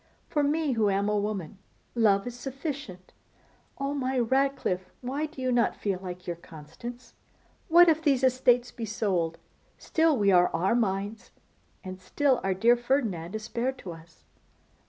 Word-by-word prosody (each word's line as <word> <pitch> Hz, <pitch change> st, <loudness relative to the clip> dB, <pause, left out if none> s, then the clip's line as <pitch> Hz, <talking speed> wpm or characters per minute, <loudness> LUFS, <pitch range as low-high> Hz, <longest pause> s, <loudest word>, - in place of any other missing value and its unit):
For 295 Hz, -, +1 dB
me, 295 Hz, +1 st, +1 dB
who 220 Hz, -4 st, +2 dB
am 200 Hz, +1 st, +1 dB
a 210 Hz, -, +1 dB
woman, 200 Hz, -3 st, -4 dB, 0.3 s
love 205 Hz, -4 st, +3 dB
is 245 Hz, -, -5 dB
sufficient. 265 Hz, -, -6 dB, 0.6 s
Oh! 275 Hz, +1 st, -2 dB
my 265 Hz, -2 st, -1 dB
Ratcliffe, 250 Hz, -7 st, 0 dB
why 275 Hz, +5 st, -2 dB
do 300 Hz, -3 st, -14 dB
you 255 Hz, -, +1 dB
not 240 Hz, -1 st, +2 dB
feel 195 Hz, -3 st, -2 dB
like 180 Hz, -1 st, -7 dB
your 170 Hz, -1 st, -4 dB
Constance? 170 Hz, +11 st, -10 dB, 0.5 s
What 350 Hz, 0 st, +7 dB
if 320 Hz, -1 st, +3 dB
these 275 Hz, -5 st, +2 dB
estates 250 Hz, -1 st, +3 dB
be 230 Hz, -, -5 dB
sold, 185 Hz, -6 st, -1 dB, 0.4 s
still 320 Hz, -3 st, +2 dB
we 200 Hz, -2 st, +3 dB
are 180 Hz, -1 st, +5 dB
Armines! 200 Hz, +1 st, 0 dB, 0.5 s
and 185 Hz, -1 st, -8 dB
still 265 Hz, +8 st, +1 dB
our 190 Hz, -1 st, 0 dB
dear 235 Hz, +5 st, +5 dB
Ferdinand 225 Hz, -, -1 dB
is 215 Hz, -, -4 dB
spared 245 Hz, +4 st, -2 dB
to 185 Hz, -, -8 dB
us! 165 Hz, 0 st, -14 dB
235 Hz, 155 wpm, -28 LUFS, 190-265 Hz, 0.6 s, What